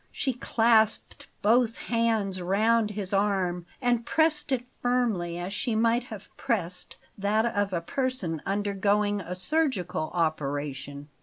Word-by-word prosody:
She 265 Hz, -, -1 dB
clasped 225 Hz, -3 st, +2 dB, 0.2 s
both 230 Hz, +2 st, +3 dB
hands 225 Hz, -5 st, 0 dB
round 215 Hz, +4 st, +2 dB
his 205 Hz, -2 st, -5 dB
arm 190 Hz, -3 st, 0 dB
and 245 Hz, -2 st, +1 dB
pressed 310 Hz, +1 st, +2 dB
it 250 Hz, -2 st, 0 dB, 0.2 s
firmly, 225 Hz, -9 st, 0 dB
as 180 Hz, +3 st, -4 dB
she 230 Hz, +2 st, -1 dB
might 230 Hz, +2 st, +2 dB
have 215 Hz, -4 st, -9 dB
pressed 185 Hz, -9 st, -3 dB, 0.2 s
that 210 Hz, +3 st, +2 dB
of 205 Hz, -4 st, 0 dB
a 170 Hz, -2 st, -1 dB
person 195 Hz, -, -1 dB
undergoing 205 Hz, +1 st, 0 dB
a 180 Hz, 0 st, -5 dB
surgical 185 Hz, -, 0 dB
operation. 145 Hz, -3 st, -2 dB
205 Hz, 130 wpm, -27 LUFS, 180-235 Hz, 0.2 s, both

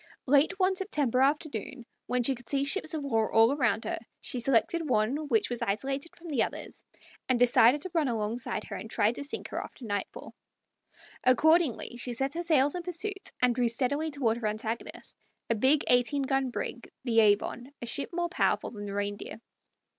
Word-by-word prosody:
Late 290 Hz, +8 st, +3 dB
one 380 Hz, 0 st, +2 dB
September 290 Hz, -, 0 dB
afternoon, 280 Hz, -2 st, -1 dB, 0.2 s
when 250 Hz, 0 st, 0 dB
she 270 Hz, -, +2 dB
could 245 Hz, -1 st, -12 dB
see 275 Hz, -1 st, +1 dB
ships 315 Hz, +2 st, 0 dB
of 300 Hz, -, -3 dB
war 225 Hz, -5 st, 0 dB
all 225 Hz, +2 st, +5 dB
around 250 Hz, -6 st, +1 dB
her, -, -, -3 dB, 0.2 s
she 250 Hz, -, -3 dB
selected 275 Hz, +6 st, +1 dB
one 255 Hz, +7 st, +1 dB
which 425 Hz, +7 st, +2 dB
was 240 Hz, -, -2 dB
isolated 270 Hz, +9 st, -2 dB
from 340 Hz, 0 st, -11 dB
the 275 Hz, -7 st, +1 dB
others, -, -, -4 dB, 0.5 s
and 255 Hz, -, +3 dB
decided 245 Hz, +3 st, +5 dB
to 370 Hz, -, -6 dB
run 320 Hz, -4 st, +2 dB
alongside 225 Hz, -1 st, -2 dB
her -, -, -7 dB
and 220 Hz, -, -7 dB
try 220 Hz, -1 st, +2 dB
to 245 Hz, -, -6 dB
sink 285 Hz, -, -4 dB
her -, -, -3 dB
after 250 Hz, -, -11 dB
nightfall. 205 Hz, -2 st, -5 dB, 0.9 s
Accordingly 285 Hz, -1 st, +3 dB
she 245 Hz, 0 st, -3 dB
set 270 Hz, +4 st, -2 dB
her 340 Hz, -, -2 dB
sails 295 Hz, -5 st, +3 dB
in 360 Hz, -, -3 dB
pursuit, 380 Hz, +4 st, -3 dB
and 250 Hz, -1 st, +5 dB
drew 245 Hz, 0 st, +1 dB
steadily 280 Hz, +7 st, 0 dB
toward 250 Hz, -6 st, 0 dB
her 225 Hz, -2 st, -2 dB
antagonist, 220 Hz, +2 st, -5 dB, 0.4 s
a -, -, +5 dB
big 260 Hz, +7 st, +3 dB
eighteen 250 Hz, +3 st, +3 dB
gun 270 Hz, -1 st, 0 dB
brig, -, -, -5 dB
the 230 Hz, -3 st, +2 dB
Avon, 220 Hz, +4 st, +2 dB
a -, -, -6 dB
ship 275 Hz, +4 st, -1 dB
more 345 Hz, 0 st, -1 dB
powerful 340 Hz, -, 0 dB
than 205 Hz, -2 st, -7 dB
the 200 Hz, 0 st, -5 dB
Reindeer. 205 Hz, +1 st, -4 dB
260 Hz, 190 wpm, -29 LUFS, 230-300 Hz, 0.9 s, all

